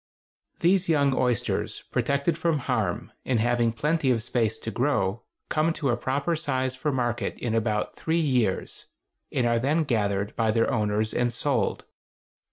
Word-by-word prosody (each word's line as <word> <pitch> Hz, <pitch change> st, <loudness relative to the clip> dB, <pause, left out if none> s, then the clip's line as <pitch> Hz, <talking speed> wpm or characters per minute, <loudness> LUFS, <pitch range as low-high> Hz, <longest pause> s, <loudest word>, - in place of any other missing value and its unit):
These 180 Hz, +1 st, +3 dB
young 140 Hz, -4 st, +3 dB
oysters, 125 Hz, -4 st, -1 dB
protected 140 Hz, +3 st, +1 dB
from 165 Hz, -1 st, +1 dB
harm, 110 Hz, -9 st, -2 dB
and 125 Hz, -3 st, +1 dB
having 120 Hz, 0 st, +2 dB
plenty 150 Hz, +5 st, 0 dB
of 115 Hz, -3 st, +2 dB
space 115 Hz, -2 st, 0 dB
to 115 Hz, -, -5 dB
grow, 115 Hz, -6 st, 0 dB, 0.3 s
come 155 Hz, +2 st, +1 dB
to 150 Hz, -4 st, -1 dB
a -, -, +2 dB
proper 140 Hz, +7 st, -1 dB
size 130 Hz, -4 st, -1 dB
for 150 Hz, +3 st, -1 dB
market 120 Hz, -3 st, -1 dB
in 120 Hz, -3 st, -2 dB
about 110 Hz, -2 st, 0 dB
three 160 Hz, +1 st, -1 dB
years, 125 Hz, -, 0 dB, 0.4 s
and 125 Hz, -, +1 dB
are 120 Hz, 0 st, +2 dB
then 150 Hz, +6 st, +2 dB
gathered 100 Hz, -6 st, 0 dB
by 115 Hz, -1 st, +1 dB
their 115 Hz, +1 st, +2 dB
owners 105 Hz, 0 st, 0 dB
and 120 Hz, 0 st, +1 dB
sold. 120 Hz, -, 0 dB
125 Hz, 160 wpm, -26 LUFS, 115-145 Hz, 0.4 s, These